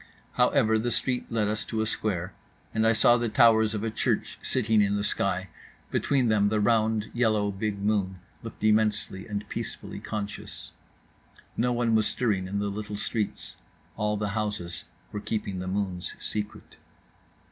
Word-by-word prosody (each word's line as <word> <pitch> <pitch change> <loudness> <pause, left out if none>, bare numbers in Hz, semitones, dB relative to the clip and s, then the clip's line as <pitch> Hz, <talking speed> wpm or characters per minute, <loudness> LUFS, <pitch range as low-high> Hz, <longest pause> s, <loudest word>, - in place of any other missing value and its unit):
However 125 -3 +3
the 120 +2 0
street 125 +1 0
led 110 -2 +1
us 105 0 -1
to 110 - -3
a 110 - +2
square, 100 -4 -2 0.4
and 110 0 +3
I - - +6
saw 120 +2 +5
the 120 -1 -1
towers 110 0 +5
of 105 - -3
a 115 - -1
church 110 - -1
sitting 110 -4 +2
in 100 0 +2
the 100 - 0
sky; 95 -2 0 0.4
between 135 -4 +2
them 105 -2 +3
the 110 0 +1
round, 110 0 +2
yellow, 110 -4 +2
big 100 +1 -2
moon 100 -3 +1 0.2
looked - - -9
immensely 105 -2 +1
and 105 0 -4
peacefully - - -5
conscious… 105 -1 -6 0.8
no 125 +1 +1
one 120 -1 +1
was 110 -1 +4
stirring 100 -7 0
in 100 +2 -3
the 100 0 0
little 105 0 -5
streets, 105 0 -3 0.4
all 105 0 0
the 105 0 -1
houses 100 -5 -3 0.3
were 105 - -4
keeping 100 -4 -3
the 95 - -4
moon's 95 -2 -2
secret. 105 -1 -5
105 Hz, 165 wpm, -27 LUFS, 100-110 Hz, 0.8 s, I